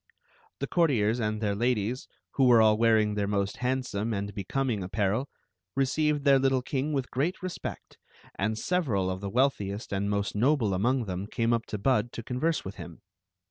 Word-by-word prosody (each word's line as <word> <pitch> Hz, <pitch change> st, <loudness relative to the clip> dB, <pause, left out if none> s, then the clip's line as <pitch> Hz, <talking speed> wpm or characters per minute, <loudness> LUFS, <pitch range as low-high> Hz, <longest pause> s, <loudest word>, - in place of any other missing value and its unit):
a -, -, -32 dB
The -, -, -1 dB
courtiers 125 Hz, -, +2 dB
and 110 Hz, -1 st, -1 dB
their 105 Hz, -2 st, 0 dB
ladies, 120 Hz, +2 st, -1 dB, 0.2 s
who 135 Hz, -, +2 dB
were 120 Hz, -2 st, +7 dB
all 110 Hz, -1 st, +5 dB
tar 115 Hz, 0 st, +4 dB
ing 105 Hz, -1 st, +1 dB
their 100 Hz, -1 st, -1 dB
most 100 Hz, -1 st, -1 dB
handsome 125 Hz, -4 st, -1 dB
and 100 Hz, +1 st, -4 dB
becoming 110 Hz, +3 st, -2 dB
apparel, 100 Hz, +7 st, -1 dB, 0.5 s
re 135 Hz, 0 st, +3 dB
ceived 150 Hz, +1 st, 0 dB
their 140 Hz, -1 st, +5 dB
little 135 Hz, -1 st, +2 dB
king 140 Hz, +3 st, -2 dB
with 135 Hz, -4 st, -2 dB
great 160 Hz, +9 st, -1 dB
respect, 185 Hz, -1 st, -6 dB, 0.3 s
and 110 Hz, +3 st, -1 dB
several 115 Hz, -, 0 dB
of 95 Hz, +1 st, -5 dB
the 100 Hz, -, -3 dB
wealthiest 105 Hz, -4 st, 0 dB
and 100 Hz, +1 st, -1 dB
most 100 Hz, 0 st, -1 dB
noble 120 Hz, -2 st, +2 dB
among 120 Hz, +6 st, +1 dB
them 95 Hz, 0 st, -4 dB
came 115 Hz, +2 st, 0 dB
up 115 Hz, -1 st, -1 dB
to 105 Hz, -, -4 dB
Bud 120 Hz, +1 st, +1 dB
to 115 Hz, -, -6 dB
converse 145 Hz, +8 st, -1 dB
with 95 Hz, -, -7 dB
him. 85 Hz, -2 st, -10 dB
115 Hz, 190 wpm, -28 LUFS, 100-135 Hz, 0.5 s, were